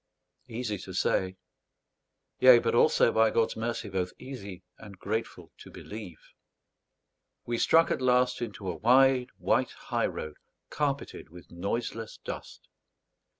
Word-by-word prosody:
Easy 115 -4 -4
to 95 0 -9
say: 95 +1 0 1.0
yea, 130 -1 +9
but 115 -1 0
also, 115 - +4
by 110 0 +4
God's 115 +1 +1
mercy, 115 0 -3
both 95 -2 -2
easy 100 -9 -9 0.2
and 105 -3 -12
grateful 110 +4 -4
to - - -12
believe! 105 -6 -9 1.3
We 120 -1 -2
struck 165 0 +4
at - - -1
last 125 0 +2
into 105 -4 -6
a 90 -3 -3
wide 125 +3 +4
white - - +1
high - - -2
road 80 -1 -7 0.3
carpeted 140 - -3
with 90 +2 -14
noiseless 110 +5 -4
dust. - - -9
115 Hz, 130 wpm, -28 LUFS, 95-125 Hz, 1.3 s, yea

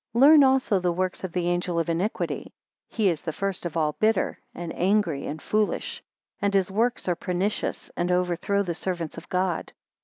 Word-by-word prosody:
11 275 +5 +8
Learn 305 -2 +8
also 260 -6 +3
the 180 -1 +1
works 185 +2 -2
of 185 - -3
the 175 0 -1
angel 175 0 0
of 165 - +1
iniquity. 175 +6 -2 0.3
He 220 -3 +1
is 165 -4 +1
first 180 +2 -3
of 165 - -5
all 155 -2 +2
bitter, 215 -2 +1 0.2
and 170 -1 -5
angry, 180 -6 +1
and 155 - -4
foolish; 215 - -1 0.4
and 200 - +2
his 190 -1 +2
works 235 +3 0
are 180 - +3
pernicious, 185 +4 -2
and 175 +1 0
overthrow 180 +3 +1
the 175 -3 -2
servants 175 -2 -4
of - - -18
God. 180 -2 -1
185 Hz, 185 wpm, -26 LUFS, 175-205 Hz, 0.4 s, 11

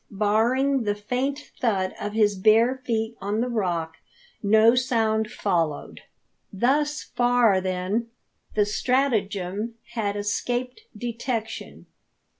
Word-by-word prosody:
Barring 235 +7 +2
the 205 -2 0
faint 255 +7 -3
thud 195 -6 0
of 205 0 -3
his 210 -2 +3
bare 225 +6 +4
feet 225 -1 -1
on 205 +2 -1
the 245 - 0
rock, 175 -8 -2 0.4
no 220 +2 +5
sound 225 -4 +1
followed. 165 -9 -2 0.5
Thus 290 +8 +1
far, 245 -5 +3
then, 185 +5 -1 0.5
the 210 -1 +3
stratagem 215 -3 0 0.2
had 205 -3 -1
escaped 245 - -2 0.2
detection. 235 -1 -4
220 Hz, 105 wpm, -25 LUFS, 205-245 Hz, 0.5 s, no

